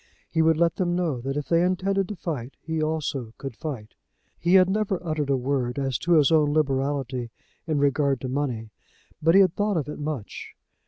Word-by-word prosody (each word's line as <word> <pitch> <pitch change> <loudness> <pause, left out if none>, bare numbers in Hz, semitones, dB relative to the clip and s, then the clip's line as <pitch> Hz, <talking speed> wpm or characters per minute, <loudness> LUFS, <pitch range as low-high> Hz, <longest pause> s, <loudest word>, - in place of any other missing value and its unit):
He 160 - +2
would 160 -1 +4
let 170 0 +2
them 175 -2 0
know, 165 -9 -1
that 135 +3 -3
if 150 - -3
they 170 0 +3
intended 190 +1 +1
to 210 - -5
fight, 145 -8 -5
he 160 0 -3
also 145 -7 -2
could 135 -4 -7
fight. 120 -9 -6 0.5
He 175 +3 +3
had 185 -1 +7
never 195 -1 0
uttered 155 -3 -1
a 135 - +3
word 130 -1 -1
as 135 -3 -1
to 175 - +1
his 155 -2 +5
own 150 -2 +4
liberality 135 -4 0 0.4
in 155 -2 0
regard 140 -1 +2
to 130 - -3
money, 125 -5 -3 0.5
but 165 +3 +4
he 195 - +8
had 185 -3 +4
thought 205 -1 0
of 150 - -2
it 150 - -6
much. 145 -8 -5
150 Hz, 205 wpm, -25 LUFS, 135-170 Hz, 0.5 s, he